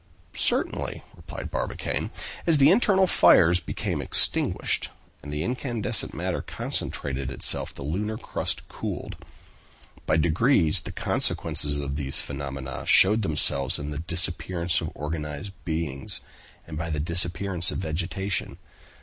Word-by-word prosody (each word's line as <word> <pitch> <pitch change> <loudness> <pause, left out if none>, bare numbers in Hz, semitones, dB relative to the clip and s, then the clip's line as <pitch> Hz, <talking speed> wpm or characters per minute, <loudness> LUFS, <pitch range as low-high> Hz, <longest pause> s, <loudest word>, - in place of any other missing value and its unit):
"Certainly," - - -1
replied - - -8
Barbicane; - - -3 0.4
"as 165 -2 +6
the 140 +3 +6
internal 195 -2 +4
fires 90 - +5
became - - -4
extinguished, - - +3 0.3
and 75 - -8
the 75 +1 -2
incandescent 120 -1 -2
matter - - -3
concentrated 70 -2 -4
itself, 65 - +1
the 70 - -10
lunar 105 +9 -3
crust - - -4
cooled. - - -6 0.9
By 80 - +3
degrees 85 - +3
the - - -7
consequences 75 0 +3
of 70 0 -4
these 70 -2 +2
phenomena 70 -2 -5
showed 105 +4 +5
themselves 75 -6 +1
in 75 +1 -5
the 75 - -4
disappearance 85 +1 -1
of 80 - -4
organized 75 +4 -5
beings, 80 -5 -2 0.4
and 80 -2 -7
by 85 +1 -3
the 75 -2 -2
disappearance 85 +2 +1
of - - -3
vegetation. 90 +3 -3
85 Hz, 125 wpm, -25 LUFS, 75-95 Hz, 0.9 s, as